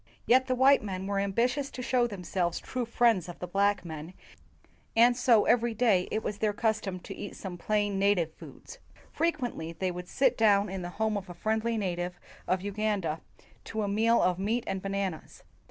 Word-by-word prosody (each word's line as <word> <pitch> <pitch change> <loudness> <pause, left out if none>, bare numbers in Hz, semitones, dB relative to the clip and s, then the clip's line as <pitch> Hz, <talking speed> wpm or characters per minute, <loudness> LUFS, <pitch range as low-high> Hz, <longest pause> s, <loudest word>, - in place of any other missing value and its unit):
Yet 260 +1 +4
the 255 - +1
white 270 +2 +5
men 190 -2 -4
were 200 0 -1
ambitious 245 +8 0
to 250 - -7
show 245 -1 +2
them 200 -5 -8
selves 175 -1 -1
true 250 -2 -4
friends 230 -7 +2
of 175 - -8
the - - -5
black 200 +2 +1
men, 160 +2 -7 0.8
and 240 +2 +6
so 240 -3 +4
every 235 -1 +2
day 210 -6 +3
it 220 - -2
was 205 - -4
their 215 -1 +1
custom 215 -4 -1
to - - -8
eat 205 - -7
some 190 -3 -6
plain 205 +2 0
native 190 -5 +2
foods. - - -12 0.3
Frequently 245 - -2
they 185 +2 -2
would 180 0 -7
sit 260 +2 +1
down 205 -2 +4
in 190 0 -4
the 175 - -5
home 220 -1 +1
of 195 -1 -7
a 175 - -8
friendly 220 +3 -1
native 180 -3 -3 0.3
of 185 0 +1
Uganda 205 -5 -1 0.4
to 220 -1 -3
a - - -1
meal 225 +3 +3
of 180 0 +1
meat 225 +5 0
and 190 - -3
bananas. 195 -4 -4
205 Hz, 195 wpm, -29 LUFS, 185-230 Hz, 0.8 s, and